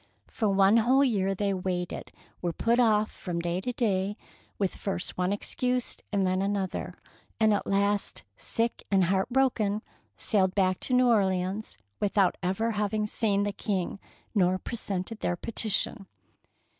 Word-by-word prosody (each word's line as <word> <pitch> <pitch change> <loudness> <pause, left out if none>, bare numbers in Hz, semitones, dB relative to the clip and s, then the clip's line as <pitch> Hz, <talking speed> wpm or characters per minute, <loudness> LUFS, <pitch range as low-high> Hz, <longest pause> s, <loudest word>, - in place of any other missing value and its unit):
For 220 -3 0
one 195 +2 +5
whole 255 +5 +4
year 195 -7 +1
they 200 +1 0
waited, 180 -1 -3 0.3
were 175 -2 -1
put 235 +6 +1
off 215 -3 +3
from 175 -2 -4
day 175 +2 -1
to 250 - -2
day 205 -4 0 0.4
with 195 -3 0
first 195 -3 -3
one 180 +1 0
excuse 250 +4 -1 0.2
and 200 -2 +1
then 185 0 +1
another, 195 -1 -2 0.4
and 220 -1 +4
at 205 - -1
last, 200 +1 0
sick 230 - -2
and 195 -2 +4
heart 190 +4 +1
broken, 235 -5 +1 0.3
sailed 190 -3 +1
back 185 -2 +2
to 255 - 0
New 250 0 +5
Orleans 195 - +1 0.2
without 200 -2 +2
ever 195 +5 0
having 210 0 0
seen 205 -1 +1
the 205 0 -1
King 195 -2 -2 0.3
nor 185 -3 +3
presented 205 0 -4
their 175 - 0
petition! 215 0 -1
200 Hz, 150 wpm, -28 LUFS, 185-220 Hz, 0.4 s, one